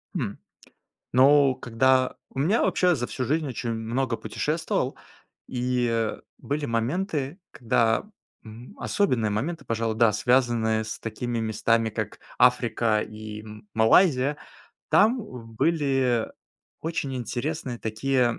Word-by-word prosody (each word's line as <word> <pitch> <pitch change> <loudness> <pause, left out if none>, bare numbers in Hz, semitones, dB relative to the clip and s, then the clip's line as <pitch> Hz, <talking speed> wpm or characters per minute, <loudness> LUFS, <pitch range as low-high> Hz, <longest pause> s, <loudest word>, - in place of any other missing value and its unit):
М. 120 - -3 0.7
Ну, 140 +1 +6
когда, 130 +2 +2
у 135 - -6
меня 185 +11 +2
вообще 180 -1 +3
за 120 -3 -3
всю 130 - -3
жизнь 155 +3 0
очень 120 -2 -3
много 115 +2 -2
путешествовал 150 -4 -2 0.5
и 120 -3 0 0.2
были 145 +1 -3
моменты, 140 - -2
когда, 115 -1 +1 0.4
м, 115 +3 -12
особенные 125 - +1
моменты, 140 +12 -2
пожалуй, 115 -1 -1
да, 115 -2 +5
связанные 115 -1 +2
с 110 - -6
такими 115 +2 -3
местами 110 +1 +1
как - - -5 0.2
Африка 110 -2 +3
и 110 0 -7
м 105 -1 -12
Малайзия. 135 +4 +4 0.5
Там 230 +5 +4 0.3
были 135 -5 +1 0.5
очень 155 -4 -3
интересные 125 +1 -3
такие 120 +2 0
120 Hz, 115 wpm, -25 LUFS, 110-140 Hz, 0.7 s, Ну